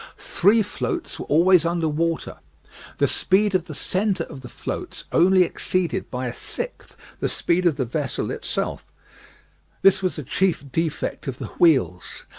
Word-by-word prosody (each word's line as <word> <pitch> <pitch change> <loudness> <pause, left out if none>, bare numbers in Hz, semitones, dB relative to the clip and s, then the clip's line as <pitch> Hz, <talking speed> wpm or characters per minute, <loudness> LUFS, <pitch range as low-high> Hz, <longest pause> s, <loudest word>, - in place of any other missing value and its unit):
Three 210 +5 +3
floats 345 - -4
were - - -6
always 170 +3 +5
under 170 -1 0
water. 165 +2 -1 0.6
The - - +3
speed 200 +2 +2
of 180 -3 +1
the 155 - -7
centre 190 +2 0
of 135 - -10
the 125 - -10
floats - - -6
only 185 +1 +5
exceeded 185 +1 -1
by 125 0 -3
a 120 - -3
sixth 485 - -6 0.2
the - - 0
speed 175 +1 +1
of 160 - +2
the 130 - -1
vessel 135 +2 -2
itself; - - -4 0.9
this 195 - +5
was 185 -1 -1
the 150 - -5
chief 180 +3 0
defect 155 0 -2
of 130 -2 -3
the - - -7
wheels. 130 - +2
170 Hz, 160 wpm, -23 LUFS, 150-190 Hz, 0.9 s, always